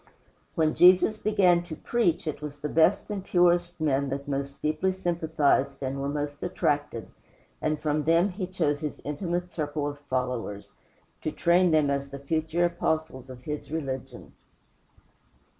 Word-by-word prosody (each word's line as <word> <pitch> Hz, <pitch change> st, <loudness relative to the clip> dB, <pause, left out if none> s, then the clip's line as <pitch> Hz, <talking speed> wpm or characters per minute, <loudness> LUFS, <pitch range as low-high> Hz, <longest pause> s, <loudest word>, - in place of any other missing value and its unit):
When 155 Hz, -1 st, +2 dB
Jesus 185 Hz, +4 st, +6 dB
began 195 Hz, -5 st, +3 dB
to 165 Hz, -2 st, -6 dB
preach, 175 Hz, -8 st, 0 dB
it 155 Hz, -2 st, -4 dB
was 150 Hz, -1 st, -6 dB
the 150 Hz, +1 st, -4 dB
best 165 Hz, +7 st, +3 dB
and 200 Hz, -2 st, -3 dB
purest 175 Hz, -1 st, +2 dB
men 140 Hz, -3 st, +1 dB
that 140 Hz, +2 st, -4 dB
most 140 Hz, 0 st, -3 dB
deeply 170 Hz, +5 st, 0 dB
sympathized 160 Hz, -6 st, 0 dB
and 135 Hz, +1 st, -3 dB
were 140 Hz, -, -1 dB
most 145 Hz, 0 st, -4 dB
attracted, 145 Hz, -9 st, -1 dB, 0.6 s
and 155 Hz, -1 st, 0 dB
from 150 Hz, 0 st, 0 dB
them 165 Hz, +4 st, +4 dB
he 185 Hz, 0 st, -4 dB
chose 160 Hz, -6 st, 0 dB
his 150 Hz, -1 st, -5 dB
intimate 175 Hz, +4 st, -3 dB
circle 150 Hz, -2 st, -2 dB
of 145 Hz, 0 st, -6 dB
followers 125 Hz, -7 st, -3 dB, 0.5 s
to 155 Hz, -, -2 dB
train 175 Hz, +3 st, +3 dB
them 155 Hz, -3 st, +3 dB
as 140 Hz, 0 st, -2 dB
the 140 Hz, -, -7 dB
future 160 Hz, +4 st, 0 dB
Apostles 160 Hz, -6 st, -2 dB
of 125 Hz, -1 st, -10 dB
his 150 Hz, +1 st, -5 dB
religion. 135 Hz, -5 st, -5 dB
155 Hz, 155 wpm, -27 LUFS, 140-175 Hz, 0.6 s, Jesus